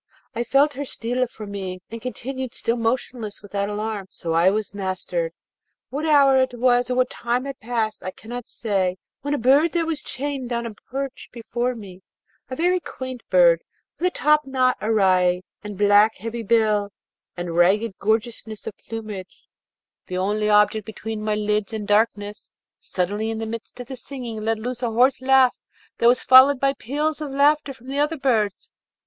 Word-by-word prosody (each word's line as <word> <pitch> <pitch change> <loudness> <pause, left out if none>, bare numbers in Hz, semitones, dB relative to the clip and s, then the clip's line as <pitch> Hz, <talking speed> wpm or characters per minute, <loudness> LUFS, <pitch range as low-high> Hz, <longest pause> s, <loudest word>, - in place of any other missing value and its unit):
I 235 - -1
felt 280 +4 +3
her 280 +1 -4
steal 250 -1 -2
from 215 -3 -9
me, 190 -2 -5
and 230 0 -6
continued 260 +1 -5
still 230 - 0
motionless 230 -2 -2
without 200 0 -2
alarm: 210 -1 -3
so 165 - -5 0.2
was 210 -1 -2
I - - -9
mastered. 195 - -2 0.6
What 300 +4 -2
hour 275 -3 +6
it 260 -1 -1
was 245 0 +2
or 250 - 0
what 255 0 +2
time 240 +2 -1
had 275 -1 -6
passed 220 -2 -2
I 185 - -4
cannot 235 +5 -8
say, 190 -5 -1 0.2
when 285 +1 -1
a - - -1
bird 280 +7 +4
that 340 -1 +1
was 320 -2 -2
chained 270 -2 -4
on 235 0 -1
a 230 - -5
perch 270 +5 -6
before 240 +1 -2
me 190 -4 -11 0.5
a 260 - -4
very 360 +5 +2
quaint 260 -6 -7
bird, 170 -2 +5 0.4
with 360 - +2
a - - +3
topknot 270 -6 +2
awry, 185 -4 +3 0.2
and 210 -2 -7
black, 205 +2 +5
heavy 230 +3 -5
bill, 215 -2 +2 0.5
and 175 -1 -4
ragged 195 +5 +3
gorgeousness 220 0 -2
of - - -5
plumage 215 -5 -8 0.6
the 180 - -4
only 210 +3 0
object 210 +1 +4
between 220 +1 -6
my 215 0 0
lids 210 0 -1
and 210 -2 -4
darkness, 205 -1 0 0.3
suddenly, 205 +4 -2
in 225 - -3
the 225 - -3
midst 230 +2 -7
of 245 - -6
the 265 +2 -7
singing, 245 -4 -7
let 225 0 +1
loose 245 +2 -5
a 240 - 0
hoarse 250 +4 +3
laugh 260 -1 +5 0.5
that 235 - +4
was 245 +1 +4
followed 260 +1 +7
by 275 +1 +2
peals 295 +5 -2
of 300 - -3
laughter 285 +1 +3
from 255 -2 -14
the 275 +2 -3
other 300 +2 +1
birds. 225 -7 0
230 Hz, 180 wpm, -23 LUFS, 210-260 Hz, 0.6 s, followed